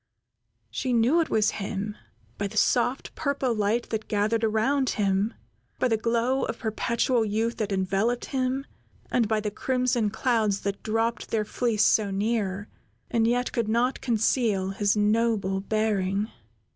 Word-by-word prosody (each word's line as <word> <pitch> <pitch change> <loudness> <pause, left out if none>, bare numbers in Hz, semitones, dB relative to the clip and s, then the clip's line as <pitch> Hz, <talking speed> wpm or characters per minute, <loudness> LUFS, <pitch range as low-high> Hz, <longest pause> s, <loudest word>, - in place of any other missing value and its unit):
She 255 -2 -2
knew 245 +9 +4
it 320 - -2
was 215 -1 +2
him 205 +1 -3 0.4
by 200 - 0
the - - -8
soft, 245 +2 +1
purple 280 -4 -1
light 215 +2 0
that 220 -1 -3
gathered 215 +2 0
around 245 +5 +2
him; 200 +2 +1 0.4
by 255 - +1
the 225 - +3
glow 235 +4 0
of 225 - -4
perpetual 235 +2 0
youth 220 +2 -1
that 215 -2 -2
enveloped 195 +5 0
him, 265 0 -1 0.5
and 230 -3 +2
by 215 0 +1
the 210 0 -3
crimson 250 -1 0
clouds 220 -3 +1
that 200 0 -3
dropped 225 +1 -1
their 215 -1 0
fleece 225 -1 0
so 210 -2 +3
near, 200 -1 -1 0.4
and 225 -1 +2
yet 245 +1 +1
could 230 -3 -1
not 240 +4 +1
conceal 220 -4 +1
his 200 +1 +1
noble 210 -2 +1
bearing. 210 -1 0
220 Hz, 150 wpm, -26 LUFS, 205-240 Hz, 0.5 s, knew